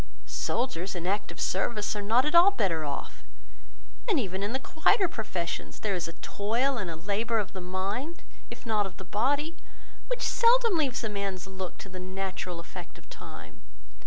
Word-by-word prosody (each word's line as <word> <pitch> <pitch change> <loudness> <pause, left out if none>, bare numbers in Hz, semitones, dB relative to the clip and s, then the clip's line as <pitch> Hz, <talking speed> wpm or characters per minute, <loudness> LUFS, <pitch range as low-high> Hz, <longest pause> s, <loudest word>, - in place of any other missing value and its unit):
Soldiers, 195 -7 -1
in 175 -1 -3
active 190 -3 -1
service, 210 +3 +1
are 205 - -2
not 230 +6 +4
at 300 - +1
all 345 +3 +9
better 185 - +1
off: 145 - -4 0.9
and 370 -8 +4
even 190 -5 -2
in 205 +2 -1
the 260 - +1
quieter 360 - +3
professions, 180 - -3
there 210 -2 0
is 175 -3 -1
a 165 - -7
toil 235 +7 +1
and 190 -5 -2
a 165 - -3
labour 205 +7 0
of 205 -4 -1
the 190 - -5
mind, 195 - -3 0.3
if - - -9
not 215 -3 +2
of 185 - -11
the - - -7
body, 285 - +1 0.5
which - - 0
seldom 470 -3 +5
leaves 270 -6 +1
a - - +1
man's 200 -3 -2
looks 190 -1 -6
to - - -10
the 185 0 -7
natural 185 -1 -4
effect 175 +1 -9
of - - -18
time. - - -10
205 Hz, 185 wpm, -29 LUFS, 185-265 Hz, 0.9 s, all